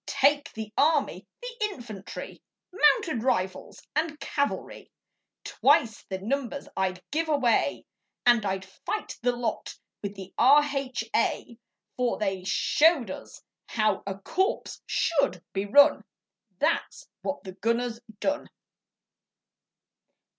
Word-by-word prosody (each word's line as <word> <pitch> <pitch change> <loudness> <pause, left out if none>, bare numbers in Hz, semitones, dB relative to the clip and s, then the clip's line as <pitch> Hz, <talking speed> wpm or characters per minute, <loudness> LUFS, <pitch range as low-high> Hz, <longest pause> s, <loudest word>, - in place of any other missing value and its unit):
Take 285 +1 +2
the 220 -1 -7
army 300 0 +2 0.2
the - - -6
infantry, 235 - -7 0.3
Mounted 360 - +3
rifles, 190 -7 -1
and 305 0 -1
cavalry, 285 -1 -3 0.5
Twice 220 -2 +2
the 190 - -2
numbers 270 +7 -3
I'd 185 -1 -1
give 320 +2 0
away, 270 -6 +2 0.4
And 240 -3 +5
I'd 190 -1 -2
fight 420 - -5
the 245 +1 +3
lot 235 -3 -3 0.2
with 200 0 -5
the 195 -1 -9
R.H.A., 265 -4 +2 0.4
For 250 -1 +1
they 195 -3 -2
showed 290 - +3
us - - -10 0.2
how 215 -3 +1
a 195 -1 -3
corps 380 - 0 0.2
SHOULD 280 - +1
be 195 +1 -1
run, 285 +7 +6 0.5
That's - - -1
what 285 - -3
the 190 - -7
gunners 230 +4 -1 0.2
done! 290 +1 -1
245 Hz, 110 wpm, -27 LUFS, 200-290 Hz, 0.5 s, run